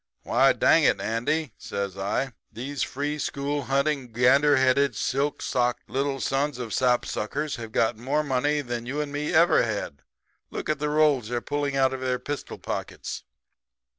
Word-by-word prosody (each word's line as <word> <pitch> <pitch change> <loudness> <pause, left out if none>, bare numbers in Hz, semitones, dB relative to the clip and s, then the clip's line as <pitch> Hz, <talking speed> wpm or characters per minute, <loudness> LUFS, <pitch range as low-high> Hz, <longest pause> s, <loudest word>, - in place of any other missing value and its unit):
"'Why, - - +4
dang - - +4
it, - - +3
Andy,' 125 +7 -1
says 100 -2 -4
I, 100 +7 -2 0.2
'these 135 +4 -5
free 145 +2 -2
school 140 0 -2
hunting, 140 -2 0
gander 135 +5 +4
headed, 130 -1 +3
silk 140 +6 -1
socked 125 -1 0
little 135 +2 -1
sons 140 +1 0
of 120 -4 -5
sap 125 -1 +2
suckers 145 +8 -3
have 115 -2 -7
got 115 0 +1
more 135 +5 0
money 145 +2 +1
than 120 -3 -5
you 140 +4 -3
and 150 -1 -2
me 145 +1 -2
ever 170 +1 +5
had. 100 -10 -3 0.5
Look - - -5
at 155 -2 0
the 150 0 -1
rolls 150 -6 +3
they're 120 0 -1
pulling 145 +1 -2
out 135 -1 +3
of 130 - -5
their 130 -1 0
pistol 145 +3 -5
pockets?' - - -5
135 Hz, 170 wpm, -26 LUFS, 120-145 Hz, 0.5 s, ever